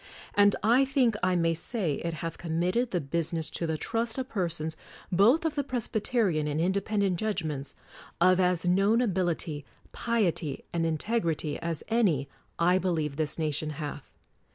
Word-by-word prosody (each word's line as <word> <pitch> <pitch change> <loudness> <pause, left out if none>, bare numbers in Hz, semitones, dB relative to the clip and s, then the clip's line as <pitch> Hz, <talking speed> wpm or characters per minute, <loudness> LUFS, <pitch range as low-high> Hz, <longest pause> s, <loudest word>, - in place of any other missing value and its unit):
And 205 0 +5
I 240 +5 +5
think 260 -4 +2
I 185 0 +2
may 165 -1 +2
say 165 - -2
it 170 -1 -2
hath 165 0 -5
committed 175 +8 0
the 180 - 0
business 165 +2 -2
to 170 - -1
the 160 -1 -1
trust 230 - -1
of 260 0 -3
persons, 165 -5 -2 0.4
both 225 - +4
of 320 - +1
the 285 - -1
Presbyterian 220 - 0
and 150 +1 -1
Indepen 200 +4 0
dent 185 -4 +1
judgments, 155 -10 -3 0.4
of 185 +1 +5
as 180 -1 +2
known 195 +5 +4
ability, 175 - -1 0.3
piety, 185 - -1
and 165 -1 +1
integrity 165 -3 -1
as 165 -2 -3
any, 195 - +2 0.3
I 180 +2 +3
believe 160 -6 -1
this 150 -1 -2
nation 155 -1 -1
hath. 145 -2 -6
175 Hz, 155 wpm, -28 LUFS, 160-215 Hz, 0.4 s, And